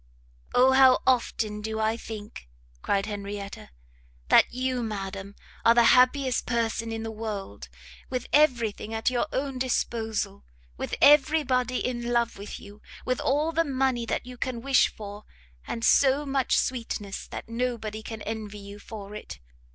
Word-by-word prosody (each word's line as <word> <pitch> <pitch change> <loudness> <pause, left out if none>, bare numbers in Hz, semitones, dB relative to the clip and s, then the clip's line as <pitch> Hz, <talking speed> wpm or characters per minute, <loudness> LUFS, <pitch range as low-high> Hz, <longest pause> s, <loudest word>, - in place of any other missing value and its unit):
"O 255 +1 +6
how 265 -1 +7
often 225 -4 +1
do 220 +1 -3
I 220 +1 +1
think," 210 - -9 0.3
cried 195 0 0
Henrietta, 200 - -6 0.6
"that - - +6
you, 255 0 -1
madam, 200 -2 -5 0.3
are 230 - +6
the 240 - +6
happiest 255 0 +3
person 230 -1 -1
in 225 0 -4
the 225 - -4
world! 205 - -6 0.4
with 255 -2 -3
every 250 -7 +4
thing 215 +2 -7
at 225 +3 +1
your 255 +4 0
own 270 -1 -2
disposal, 225 - -2 0.3
with - - -4
every 295 +2 +6
body 255 -1 0
in 240 -1 -2
love 235 -1 +1
with 205 - -7
you, 205 +1 -13 0.2
with 255 -1 0
all 300 +4 +1
the 330 +1 +2
money 260 -5 0
that - - -2
you 250 0 -10
can 240 -1 -3
wish 275 -1 +4
for, 205 0 -9 0.4
and 230 - -2
so 280 +1 +4
much 270 -2 +1
sweetness 230 -5 -3
that - - -7
nobody 230 -2 -3
can 220 -1 -7
envy 215 -1 -5
you 200 0 -10 0.3
it! 210 - -8
230 Hz, 155 wpm, -27 LUFS, 210-255 Hz, 0.6 s, how